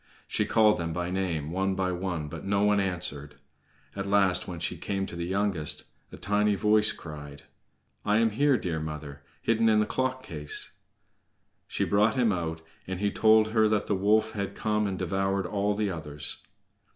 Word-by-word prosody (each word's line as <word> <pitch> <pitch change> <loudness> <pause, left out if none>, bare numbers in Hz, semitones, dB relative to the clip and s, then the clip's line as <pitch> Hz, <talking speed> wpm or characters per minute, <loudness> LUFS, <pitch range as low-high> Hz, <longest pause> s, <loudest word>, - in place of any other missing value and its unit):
She - - 0
called 110 -3 +4
them 85 -1 -2
by 90 +1 -2
name, 85 -5 -2
one 95 +2 0
by 95 -1 0
one, 90 -4 -3
but - - -8
no 100 0 +1
one 105 0 +4
answered. 75 -7 -3 0.6
At 100 0 -3
last, 100 -2 +3
when 85 -2 -6
she - - -2
came 95 -1 -2
to 90 - -8
the 85 0 -3
youngest, 95 -5 -1 0.3
a - - -9
tiny 105 +1 +1
voice 105 +1 +4
cried: 75 -3 -9 0.6
"I 105 0 +2
am 115 0 +3
here, 140 +4 +3
dear 85 -6 -2
mother, 75 -2 -6 0.2
hidden 115 0 +3
in 110 -1 +4
the 105 - +3
clock 130 +3 -2
case." 75 - -2 1.0
She - - -1
brought 105 +2 +3
him 120 -4 +3
out, 80 -3 -3 0.3
and 95 -1 -4
he 100 0 +1
told 110 0 +5
her 110 -1 +3
that 105 -1 +1
the - - 0
wolf 105 +3 +3
had 100 -1 -4
come 105 -1 0
and 95 -1 -3
devoured 95 +1 0
all 100 +2 0
the 105 -2 0
others. 75 -3 -5
95 Hz, 185 wpm, -28 LUFS, 85-105 Hz, 1.0 s, told